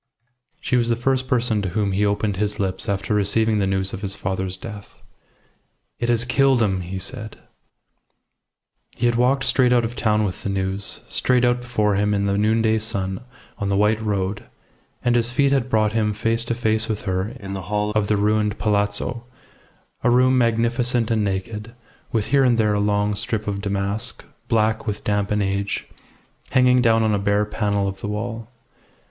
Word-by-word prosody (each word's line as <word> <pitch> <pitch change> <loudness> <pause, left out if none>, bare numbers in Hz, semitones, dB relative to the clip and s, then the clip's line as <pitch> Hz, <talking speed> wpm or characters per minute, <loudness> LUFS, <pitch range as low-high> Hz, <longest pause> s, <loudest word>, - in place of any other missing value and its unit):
She 125 - 0
was 120 -1 +1
the 115 - +2
first 130 +2 0
person 120 -5 +1
to 95 - -2
whom 100 +1 -1
he 100 +2 +1
opened 100 -1 -1
his 105 +1 -1
lips 95 -1 -1
after 100 +1 -1
receiving 105 +2 +2
the 95 - +1
news 95 0 -1
of 95 - -5
his 100 -2 -3
father's 95 -1 -3
death. 105 -3 -10 1.0
"It 120 - -1
has 120 0 +2
killed 135 0 +3
him!" 95 -3 0
he 90 +2 -5
said. 110 +3 -6 1.6
He 120 - -1
had 120 - +3
walked 125 +3 +2
straight 125 -2 +3
out 120 -1 +3
of 115 +2 -5
town 110 -2 +1
with 95 -3 -3
the - - -3
news, 95 +1 -2
straight 125 -1 +2
out 120 0 +1
before 105 -4 0
him 105 0 +1
in 100 0 0
the 100 0 +1
noonday 110 +1 +2
sun 95 -3 -2 0.4
on 100 - -1
the 100 - +1
white 105 +2 +2
road, 100 -1 -2 0.6
and 120 0 +3
his 120 0 +1
feet 135 +2 +2
had 130 -2 +1
brought 110 -2 +2
him 105 -2 +1
face 115 +2 0
to 120 - -1
face 110 -1 0
with 105 -2 -3
her 95 +5 -2
in 100 -3 -7
the 95 - -4
hall 105 0 0
of 105 -1 0
the 105 - +2
ruined 105 0 +1
palazzo, 105 +3 -1 0.8
a 125 - +4
room 130 +1 +4
magnificent 120 0 +1
and 110 -2 +2
naked, 105 +4 -4 0.4
with 110 -3 -1
here 140 +1 +4
and 125 -2 +3
there 105 -2 +2
a 105 - +1
long 105 0 +1
strip 105 +1 -2
of 100 -1 -2
damask, 100 +4 -3 0.2
black 110 0 +1
with 105 0 -3
damp 105 -1 0
and 105 -1 +1
age, 100 +1 -2 0.6
hanging 125 -1 +4
down 115 -2 +3
on 110 -1 +2
a 100 - +1
bare 100 +1 +1
panel 100 -2 -1
of 95 0 -6
the - - -4
wall. 110 +2 -4
105 Hz, 190 wpm, -22 LUFS, 100-115 Hz, 1.6 s, a